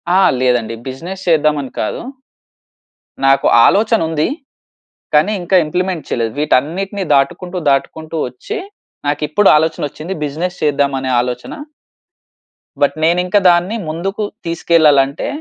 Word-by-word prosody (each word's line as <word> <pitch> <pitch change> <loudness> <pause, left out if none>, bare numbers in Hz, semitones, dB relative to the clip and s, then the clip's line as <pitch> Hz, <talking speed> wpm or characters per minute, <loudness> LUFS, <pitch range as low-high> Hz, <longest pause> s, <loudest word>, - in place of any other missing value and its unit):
ఆ! - - +5 0.2
లేదండి 120 -3 +1
బిజినెస్ 170 +9 -7
చేద్దామని 150 -4 +1
కాదు. - - -2 1.3
నాకు 135 0 +3 0.2
ఆలోచన 220 +2 +3
ఉంది. 155 -1 0 0.9
కానీ, 155 +8 +4
ఇంకా 185 +2 +2
ఇంప్లిమెంట్ 180 +1 -2
చేయలేదు. 115 -2 -1
వీటన్నిటిని 175 +8 0
దాటుకుంటూ, 175 +7 0
దాటుకుంటూ 155 +4 -2
వచ్చి 130 - -7 0.5
నాకు 145 +1 -1
ఇప్పుడు 195 +7 +3
ఆలోచనొచ్చింది, 155 +1 -2
బిజినెస్ 170 +5 -4
చేద్దాం 145 -2 +1
అనే 130 0 -3
ఆలోచన... 125 0 -4 1.3
బట్, 145 - +2
నేను 170 +2 +3
ఇంకా 205 +3 +3
దాన్ని 175 +5 +2
ముందుకు 190 +7 -3 0.2
తీసుకెళ్ళాలంటే, 155 -4 +2
155 Hz, 115 wpm, -16 LUFS, 140-180 Hz, 1.3 s, ఆ